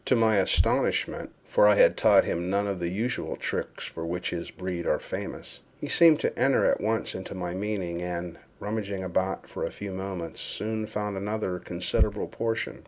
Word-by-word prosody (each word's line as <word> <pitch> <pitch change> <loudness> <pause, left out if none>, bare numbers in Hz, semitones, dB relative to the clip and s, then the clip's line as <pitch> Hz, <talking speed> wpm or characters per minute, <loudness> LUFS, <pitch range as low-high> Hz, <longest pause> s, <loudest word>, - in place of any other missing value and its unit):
To 130 - +4
my 110 -2 +4
astonishment, 95 - +2 0.2
(for 105 - +5
I 105 - +6
had - - +6
taught - - +5
him 85 +1 -2
none 100 +1 +1
of 100 -2 -2
the 85 -1 -1
usual 115 +8 -2
tricks - - -3
for 80 - -6
which 85 +2 -2
his 85 -1 -4
breed 90 -2 -4
are - - +3
famous,) - - -7 0.2
he - - -4
seemed 165 -3 +6
to - - 0
enter 135 +2 +4
at - - +2
once 110 +1 0
into 95 +1 -6
my 90 -1 -3
meaning, 95 -3 -2
and, 90 -1 -4 0.2
rummaging 100 -2 -3
about 95 +1 -1
for - - -5
a - - -1
few 100 -1 -7
moments, 95 -3 -5
soon 110 0 -3
found 105 -2 -3
another 100 -2 -2
considerable 90 +1 0
portion. 115 -1 -2
95 Hz, 185 wpm, -27 LUFS, 90-110 Hz, 0.2 s, I